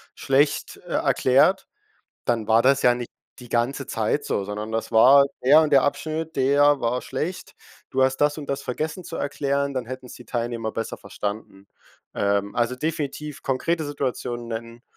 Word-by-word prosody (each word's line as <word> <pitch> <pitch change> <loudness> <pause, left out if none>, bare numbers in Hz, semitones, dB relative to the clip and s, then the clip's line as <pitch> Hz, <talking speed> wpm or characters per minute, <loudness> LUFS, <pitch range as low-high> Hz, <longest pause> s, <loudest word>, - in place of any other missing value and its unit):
schlecht, 140 +2 +1
äh, - - -5
erklärt“, 160 +9 +3 0.6
dann 115 -3 0
war 115 +1 +5
das 135 +1 +3
ja 125 - +5
nicht 120 -1 -6 0.3
die 125 - -12
ganze 125 +4 -1
Zeit 110 +6 -1
so, 100 - -1
sondern 105 +2 -5
das 115 0 -3
war 135 +5 +7 0.2
der 150 +5 +7
und 155 - 0
der 135 -2 +6
Abschnitt, 160 +2 -2
der 140 +2 +4
war 120 +2 0
schlecht. 180 +4 -5 0.4
Du 130 - +1
hast 130 0 +2
das 145 +1 +2
und 145 - -8
das 140 - -2
vergessen 155 +8 -4
zu 165 - -6
erklären, 140 0 -1
dann 125 -3 -3
hätten's 130 0 -8
die 125 - -13
Teilnehmer 115 -2 -3
besser 115 - -4
verstanden. 100 -1 -6 0.5
Ähm 100 0 0
also 120 +1 0
definitiv 150 0 -4
konkrete 155 +5 -1
Situationen 125 -4 -3
nennen 115 +1 -7
130 Hz, 170 wpm, -24 LUFS, 115-145 Hz, 0.6 s, war